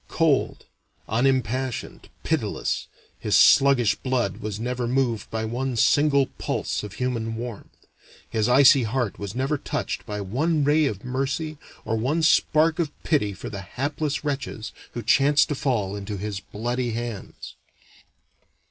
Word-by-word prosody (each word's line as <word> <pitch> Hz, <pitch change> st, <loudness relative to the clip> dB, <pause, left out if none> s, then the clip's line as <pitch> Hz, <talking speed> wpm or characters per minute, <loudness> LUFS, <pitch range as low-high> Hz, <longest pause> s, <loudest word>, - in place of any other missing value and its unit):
Cold, 155 Hz, -5 st, +1 dB, 0.4 s
unimpassioned, 130 Hz, +1 st, -1 dB
pitiless, -, -, -1 dB, 0.3 s
his -, -, +1 dB
sluggish 135 Hz, -5 st, +6 dB
blood 125 Hz, -7 st, -1 dB
was 105 Hz, -1 st, -5 dB
never 125 Hz, +1 st, -2 dB
moved 120 Hz, -4 st, 0 dB
by 110 Hz, 0 st, -2 dB
one 125 Hz, +3 st, -2 dB
single 140 Hz, +4 st, +4 dB
pulse -, -, -2 dB
of 105 Hz, -1 st, -8 dB
human 115 Hz, -3 st, -2 dB
warmth, 115 Hz, -2 st, -8 dB, 0.4 s
his 110 Hz, +1 st, 0 dB
icy 135 Hz, +1 st, +7 dB
heart 120 Hz, -1 st, -2 dB
was 100 Hz, +1 st, -6 dB
never 135 Hz, +3 st, 0 dB
touched -, -, -3 dB
by 105 Hz, 0 st, -4 dB
one 145 Hz, -, 0 dB
ray 150 Hz, +2 st, +3 dB
of 105 Hz, -2 st, -5 dB
mercy 140 Hz, +4 st, -2 dB, 0.3 s
or 115 Hz, -, 0 dB
one 140 Hz, +9 st, 0 dB
spark 160 Hz, 0 st, +3 dB
of 165 Hz, -3 st, +1 dB
pity 140 Hz, -10 st, +1 dB
for 95 Hz, -, -8 dB
the 100 Hz, -2 st, -5 dB
hapless 145 Hz, -, -3 dB
wretches 140 Hz, -6 st, -4 dB, 0.2 s
who 120 Hz, -, -5 dB
chanced 140 Hz, +6 st, +4 dB
to -, -, 0 dB
fall 120 Hz, -9 st, -1 dB
into 100 Hz, 0 st, -5 dB
his 100 Hz, 0 st, -4 dB
bloody 120 Hz, +4 st, -3 dB
hands. 115 Hz, -4 st, -6 dB
125 Hz, 140 wpm, -24 LUFS, 110-140 Hz, 0.4 s, icy